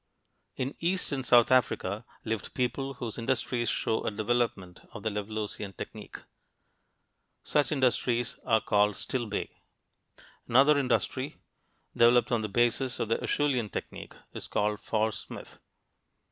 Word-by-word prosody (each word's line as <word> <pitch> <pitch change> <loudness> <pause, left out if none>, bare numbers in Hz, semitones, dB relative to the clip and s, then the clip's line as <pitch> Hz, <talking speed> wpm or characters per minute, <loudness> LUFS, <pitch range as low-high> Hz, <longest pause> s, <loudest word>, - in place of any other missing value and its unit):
In 130 +2 -2
east 180 +2 0
and 135 -2 -2
south 120 0 +5
Africa 110 -4 +1 0.2
lived 110 -3 -3
people 135 +2 -1
whose 120 -2 -4
industries 120 -1 0
show 110 - 0
a - - 0
development 110 -4 -1
of 105 - -8
the 110 - 0
Levalloisian 105 -1 -4
technique. - - -8 1.3
Such 150 +1 +1
industries 120 -3 +1
are 110 -2 +3
called 105 0 +2
Stillbay. 120 -5 -2 1.0
Another 135 +5 +6
industry, 130 +2 -1 0.6
developed 120 +1 +5
on 120 -2 +2
the 105 - -3
basis 120 +4 +1
of 110 - -1
the - - 0
Acheulean 130 -7 +1
technique, - - -7 0.2
is - - -6
called 105 0 0
Fauresmith. 110 -1 -3
120 Hz, 125 wpm, -29 LUFS, 110-130 Hz, 1.3 s, Another